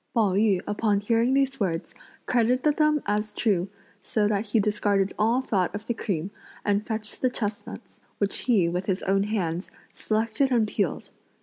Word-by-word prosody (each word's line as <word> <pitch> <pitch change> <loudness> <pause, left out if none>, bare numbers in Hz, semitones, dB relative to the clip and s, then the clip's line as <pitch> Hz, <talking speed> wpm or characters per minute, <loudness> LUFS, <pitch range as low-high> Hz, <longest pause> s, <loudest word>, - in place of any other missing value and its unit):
Pao 215 -4 +3
yü 200 -2 +3
upon 210 -1 +1
hearing 230 +5 +2
these 270 -1 +1
words 175 -4 -2 0.3
credited 250 +5 +2
them 305 -1 +3
as 210 +1 -1
true, 195 -5 +1 0.3
so 210 +2 0
that 210 +1 -1
he 220 +2 +2
discarded 205 -1 +1
all 230 +5 +2
thought 190 -6 0
of 210 +1 -6
the 235 - -1
cream 190 -5 -3 0.3
and 205 +1 +1
fetched 220 -2 -3
the 255 - +3
chestnuts, 210 -4 -5 0.2
which 200 -1 0
he, 210 -9 +2
with 180 +2 -2
his 190 -1 -1
own 195 +1 +2
hands, 185 -4 -2 0.2
selected 225 +5 0
and 230 -3 +3
pealed. - - -2
210 Hz, 170 wpm, -26 LUFS, 195-230 Hz, 0.3 s, Pao